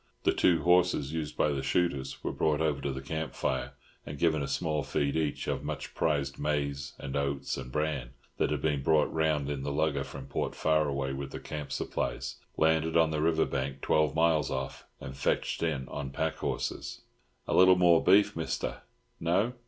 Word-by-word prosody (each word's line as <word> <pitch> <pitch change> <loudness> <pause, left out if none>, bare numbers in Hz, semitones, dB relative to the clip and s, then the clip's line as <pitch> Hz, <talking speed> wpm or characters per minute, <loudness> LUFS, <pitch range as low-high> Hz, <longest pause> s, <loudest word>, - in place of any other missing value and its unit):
The - - +3
two 85 -2 +3
horses 90 -5 +3
used 80 -2 -4
by - - +3
the 70 -2 -1
shooters 70 -2 -1
were - - -1
brought 75 -1 +1
over 75 -4 0
to 70 - -1
the 65 0 -6
camp 80 +2 -4
fire 65 +1 -1 0.3
and 75 0 -7
given 80 0 +2
a 70 - -2
small 75 +2 -1
feed 70 0 -1
each 80 -3 -1
of - - -2
much - - -5
prized 70 -4 0
maize 70 -2 -1
and 70 -1 -6
oats 70 -1 -1
and 65 -2 -7
bran, 75 -4 -1 0.3
that - - +1
had - - -2
been 75 -3 +1
brought 75 +1 +3
round 80 -3 +1
in 70 -2 -3
the 70 +1 -3
lugger 70 -2 +1
from - - -8
Port - - -3
Faraway 70 -4 +1
with 70 0 -5
the - - -7
camp 75 -2 -6
supplies, - - -3 0.2
landed 80 +1 +3
on 80 -1 +4
the 75 -1 -1
river 80 0 +3
bank 70 0 -3
twelve 75 -3 +2
miles 80 -3 +3
off, - - -4
and 65 - -7
fetched - - 0
in 75 -6 -1
on 70 0 -5
pack 80 +2 -2
horses. - - -3 0.5
"A - - -1
little 95 0 +7
more 85 -2 +5
beef, 100 +3 +5
Mister? 80 -1 -3 0.4
No? 95 +9 +1
75 Hz, 190 wpm, -30 LUFS, 70-80 Hz, 0.5 s, little